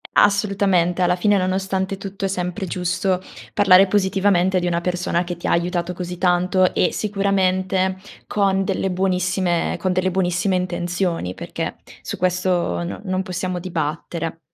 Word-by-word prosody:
Assolutamente. 195 Hz, -4 st, +3 dB
Alla 180 Hz, -, +3 dB
fine, 205 Hz, +3 st, +2 dB
nonostante 190 Hz, +1 st, -1 dB
tutto, 195 Hz, 0 st, -6 dB
è -, -, +2 dB
sempre 185 Hz, +1 st, -3 dB
giusto 180 Hz, +1 st, -1 dB, 0.3 s
parlare 195 Hz, -1 st, +6 dB
positivamente 190 Hz, -1 st, +2 dB
di 180 Hz, -, -1 dB
una 170 Hz, -1 st, 0 dB
persona 175 Hz, -1 st, -1 dB
che 175 Hz, -1 st, -5 dB
ti 170 Hz, -, -6 dB
ha -, -, +1 dB
aiutato 175 Hz, +1 st, 0 dB
così 180 Hz, 0 st, -6 dB
tanto 180 Hz, +1 st, +2 dB
e -, -, +2 dB
sicuramente 190 Hz, -2 st, 0 dB, 0.3 s
con 195 Hz, -1 st, +1 dB
delle 190 Hz, 0 st, -1 dB
buonissime 185 Hz, -1 st, 0 dB
con 185 Hz, -, 0 dB
delle 185 Hz, +1 st, +1 dB
buonissime 185 Hz, +1 st, +1 dB
intenzioni, 175 Hz, -, -2 dB
perché -, -, -5 dB, 0.3 s
su -, -, -5 dB
questo 180 Hz, -, 0 dB
no 85 Hz, -, -5 dB
non 185 Hz, -1 st, -1 dB
possiamo 185 Hz, -1 st, -3 dB
dibattere. 165 Hz, -1 st, -3 dB
185 Hz, 145 wpm, -21 LUFS, 175-190 Hz, 0.3 s, parlare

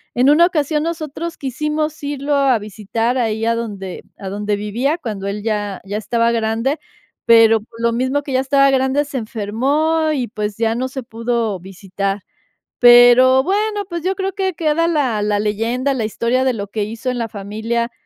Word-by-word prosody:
En 255 Hz, +4 st, +4 dB
una 340 Hz, +3 st, +6 dB
ocasión, 300 Hz, -3 st, 0 dB
nosotros 330 Hz, 0 st, -4 dB
quisimos 300 Hz, +3 st, -3 dB
irlo 285 Hz, 0 st, -2 dB
a 275 Hz, -3 st, +3 dB
visitar 220 Hz, +4 st, -2 dB
ahí 220 Hz, -2 st, -1 dB
a 230 Hz, -, +2 dB
donde 200 Hz, -5 st, -6 dB
a 195 Hz, -, -6 dB
donde 205 Hz, +1 st, -2 dB
vivía 235 Hz, +9 st, -1 dB
cuando 210 Hz, -, -5 dB
él 205 Hz, +1 st, -4 dB
ya 205 Hz, -3 st, -2 dB
ya 205 Hz, +2 st, -3 dB
estaba 230 Hz, +2 st, +1 dB
grande, 230 Hz, +6 st, 0 dB, 0.5 s
pero, 225 Hz, -1 st, +6 dB
pues, 230 Hz, +1 st, -16 dB
lo 235 Hz, 0 st, +2 dB
mismo 260 Hz, +4 st, 0 dB
que 275 Hz, -, -5 dB
ya 260 Hz, -, +3 dB
estaba 275 Hz, +1 st, +3 dB
grande, 265 Hz, +2 st, +1 dB
se 275 Hz, -2 st, -4 dB
enfermó 275 Hz, +9 st, 0 dB
y, 255 Hz, -5 st, -1 dB
pues, 210 Hz, -2 st, -4 dB
ya 225 Hz, 0 st, +1 dB
no 255 Hz, +3 st, -2 dB
se 265 Hz, 0 st, -6 dB
pudo 230 Hz, -3 st, -2 dB
visitar. 195 Hz, +2 st, -4 dB, 0.6 s
Pero, 245 Hz, +2 st, +7 dB
bueno, 415 Hz, +2 st, -1 dB
pues, 340 Hz, -2 st, -4 dB
yo 375 Hz, +1 st, +1 dB
creo 385 Hz, 0 st, -3 dB
que 380 Hz, -1 st, -1 dB
queda 330 Hz, +1 st, +1 dB
la 265 Hz, -10 st, 0 dB
la 205 Hz, 0 st, 0 dB
leyenda, 230 Hz, +6 st, -1 dB
la 230 Hz, -4 st, -2 dB
historia 235 Hz, +4 st, 0 dB
de 260 Hz, -, +2 dB
lo 205 Hz, -3 st, -5 dB
que 210 Hz, 0 st, -2 dB
hizo 225 Hz, +4 st, -5 dB
en 250 Hz, -, -4 dB
la 230 Hz, -, -2 dB
familia, 220 Hz, +4 st, -3 dB
240 Hz, 185 wpm, -18 LUFS, 215-285 Hz, 0.6 s, Pero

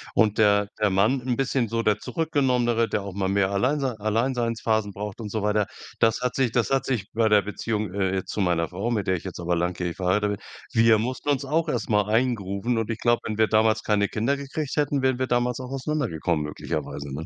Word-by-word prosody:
und 110 Hz, -2 st, +3 dB
der 105 Hz, -1 st, +4 dB
der 105 Hz, -1 st, +3 dB
Mann 105 Hz, +8 st, +2 dB
'n 125 Hz, 0 st, -1 dB
bisschen 135 Hz, -2 st, 0 dB
so 115 Hz, +1 st, -1 dB
der 105 Hz, -2 st, +2 dB
Zurückgenommenere, 125 Hz, -8 st, +1 dB
der 105 Hz, -, -1 dB
auch 100 Hz, -1 st, -6 dB
mal 95 Hz, 0 st, -1 dB
mehr 100 Hz, 0 st, +2 dB
Alleinsei 130 Hz, +7 st, +1 dB
Alleinseinseinsphasen 115 Hz, -1 st, 0 dB
braucht 105 Hz, +1 st, -6 dB
und 105 Hz, -, -5 dB
so 110 Hz, +1 st, -2 dB
weiter. 105 Hz, -1 st, +1 dB, 0.3 s
Das 115 Hz, +2 st, +3 dB
hat 125 Hz, 0 st, -1 dB
sich 130 Hz, -4 st, +1 dB
das 120 Hz, -1 st, +1 dB
hat 135 Hz, -1 st, +2 dB
sich 115 Hz, -6 st, -2 dB
bei 115 Hz, 0 st, +2 dB
der 105 Hz, -1 st, +5 dB
Beziehung, 105 Hz, 0 st, -3 dB
äh, 95 Hz, -1 st, 0 dB
jetzt 95 Hz, -, -3 dB
zu -, -, -4 dB
meiner 85 Hz, -3 st, +1 dB
Frau, 100 Hz, +6 st, -3 dB
mit 105 Hz, -5 st, -1 dB
der 95 Hz, -, +2 dB
ich -, -, -10 dB
jetzt 95 Hz, -2 st, -7 dB
aber 85 Hz, 0 st, 0 dB
langjährig 90 Hz, 0 st, -2 dB
verheiratet 100 Hz, +3 st, +1 dB
bin, -, -, -25 dB, 0.5 s
wir 115 Hz, -1 st, +6 dB
mussten 130 Hz, +6 st, -3 dB
uns 140 Hz, -1 st, +1 dB
auch 160 Hz, +4 st, 0 dB
erst 120 Hz, -6 st, -2 dB
mal 105 Hz, -2 st, +2 dB
eingrooven. 115 Hz, -1 st, 0 dB
Und 115 Hz, -1 st, -1 dB
ich 115 Hz, -, -2 dB
glaube, 120 Hz, 0 st, +3 dB
wenn 110 Hz, -, -3 dB
wir 110 Hz, 0 st, +4 dB
damals 110 Hz, 0 st, +2 dB
keine 105 Hz, -1 st, +2 dB
Kinder 115 Hz, +8 st, 0 dB
gekriegt 140 Hz, +1 st, -4 dB
hätten, 145 Hz, -1 st, +1 dB
wären 130 Hz, -1 st, +2 dB
wir 130 Hz, -, 0 dB
damals 120 Hz, 0 st, 0 dB
auch 130 Hz, -1 st, -6 dB
auseinandergekommen 125 Hz, -, -1 dB
möglicherweise, 70 Hz, -1 st, -5 dB
ne? 80 Hz, +3 st, -5 dB
110 Hz, 225 wpm, -25 LUFS, 100-125 Hz, 0.5 s, wir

